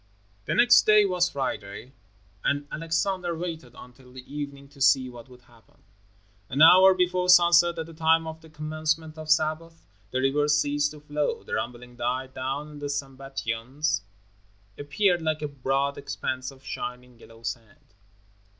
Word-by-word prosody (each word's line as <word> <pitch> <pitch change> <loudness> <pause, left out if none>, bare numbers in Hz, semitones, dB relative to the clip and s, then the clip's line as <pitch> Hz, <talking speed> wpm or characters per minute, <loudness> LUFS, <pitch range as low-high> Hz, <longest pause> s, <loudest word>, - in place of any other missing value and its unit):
The - - -1
next 240 0 +6
day 210 -1 +6
was 180 -2 +1
Friday, 125 -3 -5 0.5
and 145 0 0
Alexander 170 +2 -2
waited 160 -8 -6
until 125 +1 -15
the 130 0 -11
evening 140 -1 -6
to 140 -1 -17
see 130 -1 +4
what 120 +1 -13
would 125 -1 -17
happen. 120 -3 -24 0.7
An 140 +4 +3
hour 185 +3 +8
before 180 0 0
sunset, 175 -1 +6
at 160 - -3
the 165 - -12
time 160 0 +2
of 160 0 -8
the 160 - -16
commencement 155 +1 -3
of 155 0 -8
Sabbath, 160 +1 0 0.2
the 130 - -2
river 140 +3 +1
ceased 145 0 +1
to 150 - -13
flow. 150 0 -2
The - - -8
rumbling 120 +2 -5
died 130 +2 -3
down 135 +3 -4
and 150 -1 -11
the 145 - -4
Sambatyon 135 -2 -5 0.9
appeared 175 +5 +1
like 155 -1 -1
a - - -1
broad 140 0 -1
expanse 130 -2 -4
of 135 -1 -15
shining 125 -1 -7
yellow 115 0 -16
sand. 115 -3 -8
145 Hz, 160 wpm, -26 LUFS, 130-160 Hz, 0.9 s, hour